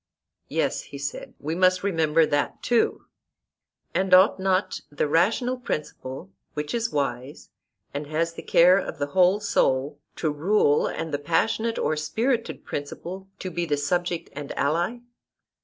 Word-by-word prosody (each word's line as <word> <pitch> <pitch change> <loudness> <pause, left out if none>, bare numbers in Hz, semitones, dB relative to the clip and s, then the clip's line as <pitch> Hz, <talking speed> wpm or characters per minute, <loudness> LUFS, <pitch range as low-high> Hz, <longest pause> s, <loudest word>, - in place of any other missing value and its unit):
Yes, - - 0
he 140 - -10
said, 140 +1 -6
we 155 +2 -3
must 185 +1 +3
remember 165 -4 +3
that 145 -1 -1
too. 240 -1 +1 0.9
And 185 0 +4
ought 190 +2 +5
not 190 0 0
the 145 +1 -1
rational 225 - +2
principle, 135 - -5 0.2
which 150 0 -3
is 230 -1 -1
wise, 135 -1 -3 0.4
and 145 +1 -4
has 165 +2 -1
the - - -8
care 180 +3 +5
of - - -5
the 145 - -1
whole 185 +2 +4
soul, 140 -8 +1 0.2
to 155 - -1
rule, 150 0 +2
and 160 -2 -4
the 145 - 0
passionate 220 +9 0
or 155 - 0
spirited 225 - -1
principle 175 +6 -6
to 185 - -5
be 170 0 -2
the 145 - +1
subject 175 +4 -1
and 145 0 -7
ally? 170 +11 0
165 Hz, 150 wpm, -25 LUFS, 145-190 Hz, 0.9 s, ought